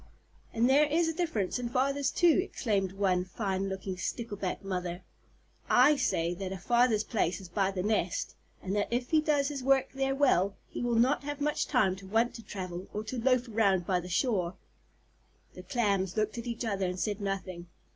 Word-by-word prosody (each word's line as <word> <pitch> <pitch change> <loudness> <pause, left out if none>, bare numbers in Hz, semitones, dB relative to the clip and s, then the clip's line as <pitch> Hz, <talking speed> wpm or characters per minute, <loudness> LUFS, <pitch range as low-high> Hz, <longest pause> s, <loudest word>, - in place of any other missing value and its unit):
"And 230 +1 +2
there 285 +3 +5
is 325 +3 +2
a 325 - -1
difference 310 - -1
in 240 -1 -3
fathers 275 +2 +1
too," 345 +1 +4
exclaimed 200 - -1
one 190 -2 +1
fine 195 0 -2
looking 190 -1 -5
Stickleback 205 -2 -4
Mother. 180 -2 -4 0.7
"I 265 +5 +6
say 175 - 0
that 190 +1 -5
a 190 - -4
father's 235 +2 +2
place 185 -7 -1
is 190 -3 -11
by 190 +2 +1
the 190 -2 -3
nest, 205 -4 -1 0.3
and 195 +1 -2
that 205 - +1
if 245 +3 -1
he 315 -1 +5
does 290 -2 +1
his 285 -2 -4
work 270 0 +3
there 270 0 0
well, 200 -9 +3
he - - -6
will 240 -1 0
not 250 +5 +3
have 290 0 -4
much 295 +1 0
time 215 -9 +2
to 195 0 -11
want 225 +4 +1
to 230 - -9
travel, 185 -3 -6
or 210 - -2
to 230 +2 -4
loaf 255 0 +2
around 200 -5 +2
by 180 -1 +1
the 180 +1 -8
shore." 180 -2 0 1.0
The - - -9
Clams 200 -7 0
looked 215 +2 0
at 235 - -7
each 235 0 -3
other 195 -4 -1
and 180 0 -4
said 205 0 -2
nothing. 185 -3 -4
215 Hz, 195 wpm, -30 LUFS, 190-255 Hz, 1.0 s, I